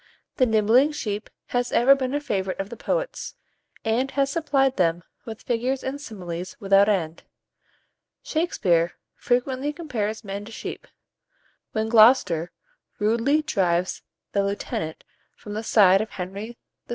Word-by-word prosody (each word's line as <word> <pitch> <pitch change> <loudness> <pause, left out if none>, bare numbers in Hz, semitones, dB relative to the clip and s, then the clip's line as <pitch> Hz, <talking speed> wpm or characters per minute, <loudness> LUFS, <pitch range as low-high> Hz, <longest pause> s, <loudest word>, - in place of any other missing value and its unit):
The 255 - +4
"nibbling 225 +7 +4
sheep" 210 -7 -4 0.2
has 245 0 -1
ever 255 +4 +6
been 270 0 -2
a - - +1
favourite 195 -9 -2
of 195 0 -3
the - - -5
poets, - - -3 0.5
and 235 +4 +1
has 275 0 0
supplied 275 -4 +1
them 170 -2 +1 0.2
with 220 -2 -8
figures 250 +3 -1
and 275 +2 -4
similes 180 -7 -7
without 195 +1 +4
end. 170 -5 -1 1.0
Shakspere 180 - +1 0.2
frequently 255 +3 -1
compares 225 -10 -4
men 200 0 -5
to 225 - -11
sheep. - - -7 0.9
When 220 0 0
Gloster 220 -7 +5 0.5
rudely 235 +8 +2
drives 185 - 0 0.3
the 200 - +1
lieutenant 195 -5 -4 0.3
from 205 - -9
the 215 - -3
side 195 -3 +5
of 215 - -4
Henry 200 +6 -6 0.3
VI. - - -38
220 Hz, 140 wpm, -24 LUFS, 195-265 Hz, 1.0 s, ever